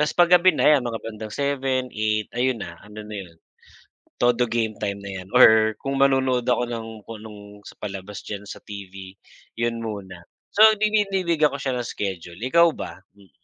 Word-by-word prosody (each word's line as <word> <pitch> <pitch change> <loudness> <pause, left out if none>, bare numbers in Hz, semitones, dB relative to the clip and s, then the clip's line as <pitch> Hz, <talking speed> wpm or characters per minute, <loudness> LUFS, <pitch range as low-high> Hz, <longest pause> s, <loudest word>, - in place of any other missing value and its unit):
tas 150 0 +1
pag-gabi 175 +1 +6
na - - +1
yan 140 - +1
mga 115 - -3
bandang 110 -1 -6
7:00, 135 -2 -1
8:00, 110 0 0
ayun 125 0 +1
na, 85 - -6
ano 105 +1 -10
na 105 - -10
yun, 85 -1 -20 0.8
todo 120 0 +3
game 115 -2 0
time 100 -1 -2
na 95 -2 -6
yan 90 - -13
or 110 -3 +6
kung 135 0 -2
manonood 130 -3 +2
ako 120 0 +2
ng 115 -2 -6
kung 115 -2 -9
anong 105 -1 -12
sa - - -11
palabas 100 -1 -7
diyan 100 -1 -5
sa - - -7
TV, 95 -2 -9 0.4
yun 120 0 -1
muna. 95 -5 -7 0.3
So, 215 - +8 0.2
dinidiliga 195 -7 +2
ko 140 - -4
siya 130 -2 -1
ng 120 - -3
schedule, 95 -3 -5
ikaw 170 +7 +4
ba? - - -7 0.2
Hmm. 100 -3 -21
115 Hz, 185 wpm, -23 LUFS, 105-130 Hz, 0.8 s, So